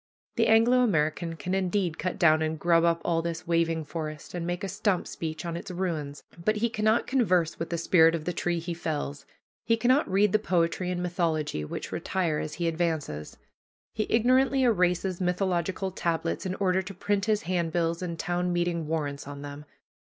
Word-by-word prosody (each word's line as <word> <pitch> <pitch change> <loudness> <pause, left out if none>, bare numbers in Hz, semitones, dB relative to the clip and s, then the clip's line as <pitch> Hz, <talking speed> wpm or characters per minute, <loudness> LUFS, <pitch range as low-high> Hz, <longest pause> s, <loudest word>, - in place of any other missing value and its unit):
The - - +3
Anglo 230 +3 +5
American 165 -6 +1
can 170 +4 -4
indeed 185 -3 0
cut 185 - -2
down 155 -4 +5
and 160 0 -1
grub 170 0 +4
up 170 0 +2
all 165 -1 +1
this 165 -1 -4
waving 165 -1 +1
forest, 155 0 -6
and 175 -1 -3
make 175 +3 -3
a - - -1
stump 200 -1 0
speech 160 0 -5
on 170 -1 -3
its 170 - -6
ruins, 165 -6 -3 0.2
but 215 +3 +2
he 230 +2 0
cannot 215 +1 +2
converse 185 -11 +1
with 165 - -3
the 170 - -1
spirit 165 -1 +5
of 155 -2 -5
the 180 - -1
tree 175 0 -1
he 170 +1 -4
fells, 150 -4 -4 0.4
he 230 0 +2
cannot 255 +5 +3
read 195 +1 +3
the 215 - +3
poetry 180 -2 0
and 180 -1 -2
mythology 160 - -1
which 75 - -6
retire 170 -5 -1
as 155 - -4
he 170 -1 -1
advances. 160 - -2 0.6
He 215 - -1
ignorantly 260 +3 +3
erases 180 -4 +1
mythological 185 +1 0
tablets 170 0 -2
in 185 - -2
order 190 -1 +1
to 195 +1 -9
print 200 +2 0
his 215 0 +1
handbills 170 -1 0
and 170 -2 -4
town 175 +2 -1
meeting 175 -2 -1
warrants 145 -3 -3
on 145 0 -7
them. 145 +1 -8
175 Hz, 190 wpm, -27 LUFS, 165-190 Hz, 0.6 s, Anglo